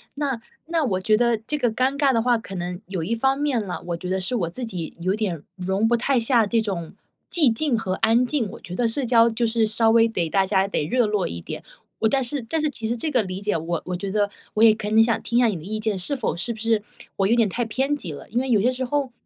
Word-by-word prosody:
那 275 -5 -2 0.3
那 330 -1 +1
我 185 -6 0
觉 215 +2 +3
得 235 -1 +2
这 260 +8 -3
个 245 -5 +1
尴 260 +4 0
尬 280 -2 +3
的 230 - +2
话， 240 0 +3
可 195 -3 -9
能 180 +1 -4
有 190 -3 -3
一 225 +7 -1
方 265 +3 +1
面 260 -8 0
啦， 180 - -5
我 170 - -1
觉 180 +2 -6
得 190 - 0
是 215 +7 -2
我 170 -7 -1
自 245 +7 -3
己 180 -7 -6
有 185 +3 0
点 190 -8 -2
容 190 +4 0
不 240 - +3
太 260 +2 +1
下 230 -1 +3
这 225 +3 +1
种 185 -6 -4 0.4
寂 300 -9 +4
静 270 0 0
和 185 -4 -2
安 225 +3 +3
静， 245 -6 -1
我 - - -10
觉 180 - -7
得 235 - +1
社 255 +4 -2
交 235 -1 +5
就 230 +1 0
是 225 0 +2
稍 225 +1 +2
微 230 0 +5
得 170 -7 -1
大 195 +2 +2
家 195 0 +2
得 150 -6 -1
热 245 +7 +2
络 210 -3 0
一 85 - -5
点。 - - -7 0.4
我 220 - +3
但 270 +2 +2
是 275 +3 -3
但 325 - 0
是 305 - +1
其 230 -5 -6
实 235 - 0
这 310 +7 -1
个 245 -6 +2
理 185 0 -5
解 205 0 0
我 165 +1 -2
我 180 - -3
觉 195 +2 -4
得 205 0 +1 0.3
我 220 - +3
也 220 -1 +8
可 210 -1 -4
能 220 +1 +5
想 230 0 0
听 235 - +1
一 - - +5
下 240 - +5
你 210 - 0
的 160 - -7
意 215 +3 -4
见， 215 -2 -1
是 185 +10 -2
否 245 - -2
是 235 +7 -2
不 220 - -12
是 225 -2 +1 0.3
我 195 - +2
有 230 - +3
点 230 - +4
太 235 +6 -2
偏 265 +6 0
激 185 - -6
了。 145 - -9
因 235 - 0
为 265 - -3
有 215 -4 +4
些 240 - +3
时 255 +1 -3
候， 275 0 -1
225 Hz, 310 characters per minute, -23 LUFS, 190-245 Hz, 0.4 s, 也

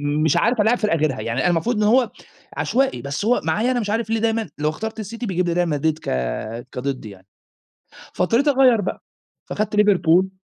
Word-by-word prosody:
مش 145 +1 +1
عارف 235 -1 +2
ألاعب 225 +4 +3
فرقة 210 -6 +1
غيرها، 150 -4 0
يعني 115 +3 -2
أنا 180 - +2
المفروض 175 +8 0
إن 210 - 0
هو 235 +2 +3 0.5
عشوائي، 270 +2 0
بس 140 +7 -4
هو 245 +3 +2
معايا 235 +4 +1
أنا 245 - 0
مش 205 -2 -3
عارف 225 0 -1
ليه 225 - +1
دايمًا 225 -2 0
لو 150 +1 0
اخترت 220 +7 -5
الCity 230 +3 -6
بيجيب 180 -3 -1
لي 170 - 0
Real - - -3
Madrid 155 +1 0
ك - - -4 0.6
كضدي 125 -4 -4
يعني. 95 -1 -15 0.9
فاضطريت 230 +10 +1
أغيَّر 260 -5 +4
بقى، 190 - -4 0.5
فخدت 210 0 -2
Liverpool. 190 -2 +3
205 Hz, 195 wpm, -21 LUFS, 155-230 Hz, 0.9 s, أغيَّر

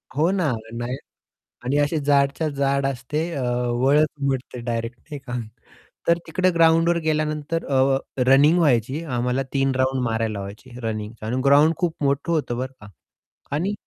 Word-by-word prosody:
हो 160 +4 +3
ना, 180 -8 +1 0.2
नाही. 120 +2 -3 0.7
आणि 135 +3 0
अशी 145 +2 +1
जाडच्या 140 +2 +2
जाड 140 -1 0
असते. 140 +5 -2
अ, 135 - -2 0.4
वळच 150 +3 +5 0.2
उमटते 130 -2 -2
डायरेक्ट 115 0 -3
नाही 145 - -5
का. 120 - -6 0.8
तर 170 0 +4
तिकडे 185 +3 +1
ग्राउंडवर 165 0 +4
गेल्यानंतर 155 +1 -1
अ, 135 0 +3 0.3
रनिंग 145 +6 +6
व्हायची 135 -1 +2
आम्हाला 125 -1 -1
3 135 -1 +1
राउंड 130 0 +1
मारायला 115 -1 -1
लावायचे 100 +6 -9
रनिंगचा. 110 -1 -5
आणि 125 +3 -1
ग्राउंड 145 +4 +5
खूप 170 -3 0
मोठं 140 +4 0
होतं 145 -7 -1
बरं 130 +1 -4
का 105 - -12 0.7
आणि 185 +7 -1
140 Hz, 150 wpm, -23 LUFS, 125-155 Hz, 0.8 s, रनिंग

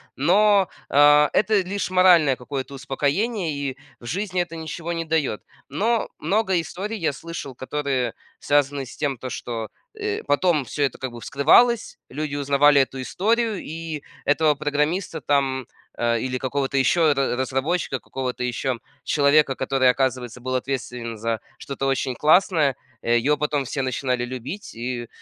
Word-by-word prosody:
Но, 195 +5 +4 0.2
а, 145 +1 +6
это 215 0 +3
лишь 190 +1 -3
моральное 175 -7 +5
какое-то 135 +2 -6
успокоение, 150 - -1
и 140 -2 -4 0.2
в - - -14
жизни 185 - -1
это 170 -1 -5
ничего 160 +1 -5
не 165 -1 -3
даёт. 155 -9 0 0.3
Но 220 - 0
много 195 -3 +1
историй 195 +7 -5
я 160 -7 0
слышал, 165 -2 -7
которые 130 -2 -2 0.3
связаны 145 -1 +1
с - - -11
тем, 140 -3 -1
то 130 +2 -6
что, 115 -3 -5 0.3
э, 425 0 -3
потом 150 0 +2
всё 145 +5 -2
это 135 - 0
как 130 -1 -5
бы 120 - -9
вскрывалось, 230 - +3
люди 145 +1 -4
узнавали 145 0 +4
эту 135 0 -3
историю, 220 - 0
и 160 -1 -6 0.2
этого 150 +1 +3
программиста 150 +5 -1
там, 135 -2 0 0.3
э, 115 -1 +1
или 130 +1 -2
какого-то 135 +1 -1
ещё 155 +3 +4
ра 135 -3 0
разработчика, 135 +3 -1
какого-то 125 -1 -4
ещё 125 +1 -1 0.3
человека, 145 -1 +3
который, 130 -1 +2
оказывается, 125 -2 -1
был 130 +1 -2
ответственен 125 -3 -3
за 115 +1 -2 0.2
что-то 135 +1 -5
очень 135 -1 0
классное, 155 -2 +3 0.3
его 120 +6 +2
потом 145 -1 -1
все 135 +2 -3
начинали 125 -1 -1
любить, 130 - -7
и, 120 0 -4
140 Hz, 150 wpm, -23 LUFS, 130-165 Hz, 0.3 s, а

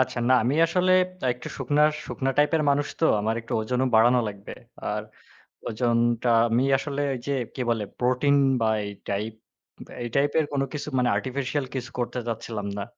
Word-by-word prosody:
আচ্ছা। 130 -1 0
না, 130 - +6
আমি 130 +4 +1
আসলে 185 +2 +2 0.4
একটু 125 - -9
শুকনা 145 +3 +1 0.2
শুকনা 135 0 -2
টাইপের 155 +2 +3
মানুষ 140 0 +1
তো। - - +3 0.2
আমার 110 +2 0
একটু 115 - -9
ওজনও 125 +4 0
বাড়ানো 120 +3 +5
লাগবে। 100 -1 -9 0.4
আর - - -2 0.7
ওজনটা 120 +1 +1 0.2
আমি 120 +3 +2
আসলে 145 0 -3 0.2
যে, 140 - -1 0.2
কি - - -7
বলে 110 -3 0
প্রোটিন 125 +3 +2 0.2
বা 110 - +2 0.2
এই 100 - -5 0.2
টাইপ 105 +3 -2 0.7
এই 120 - -3
টাইপের 145 +3 +2
কোন 140 -1 +1
কিছু 150 -1 -5
মানে 125 -1 +2
আর্টিফিশিয়াল 130 +5 -2
কিছু 130 -1 -4
করতে 125 +1 -2
চাচ্ছিলাম 115 -2 -4
না। - - -2
125 Hz, 165 wpm, -25 LUFS, 115-140 Hz, 0.7 s, না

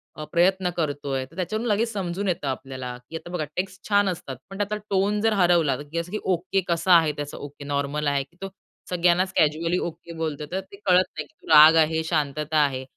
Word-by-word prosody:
अ, 155 - -6
प्रयत्न 180 +1 +3
करतोय 145 -4 -2
तर 150 +5 -20
त्याच्यावरून 215 +6 -2
लगेच 225 +3 +1
समजून 195 -1 -3
येतं 170 -5 -1
आपल्याला. 130 -2 -5
की 165 - -8
आता 165 +2 -7
बघा 155 -4 -1
टेक्स्ट 190 +1 -4
छान 205 -1 +4
असतात. 140 -7 -5
पण 195 - -8
त्यातला 205 +1 -1
टोन 200 +2 +1
जर 225 -1 +2
हरवला, 175 -7 +3
की 155 +3 -7
असं 175 +2 -6
की, 215 - -2
ओके 190 +1 0
कसा 175 +2 +3
आहे 160 -2 +2
त्याचं? 145 0 -6
ओके 145 0 -9
नॉर्मल 145 +1 -1
आहे. 140 -1 +1 0.2
तो 195 - -4 0.4
सगळ्यांनाच 180 +1 +2
कॅज्युअली 165 +3 +2
ओके 170 0 -6
बोलतो 155 -2 -3
तर 190 - -1
ते - - -10
कळत 185 -1 +5
नाही - - -3
की 315 - -31
तो - - -17
राग 155 +1 +9
आहे, 160 +1 -1
शांतता 155 -1 -1
आहे. 130 -2 -1
170 Hz, 210 wpm, -24 LUFS, 145-190 Hz, 0.4 s, राग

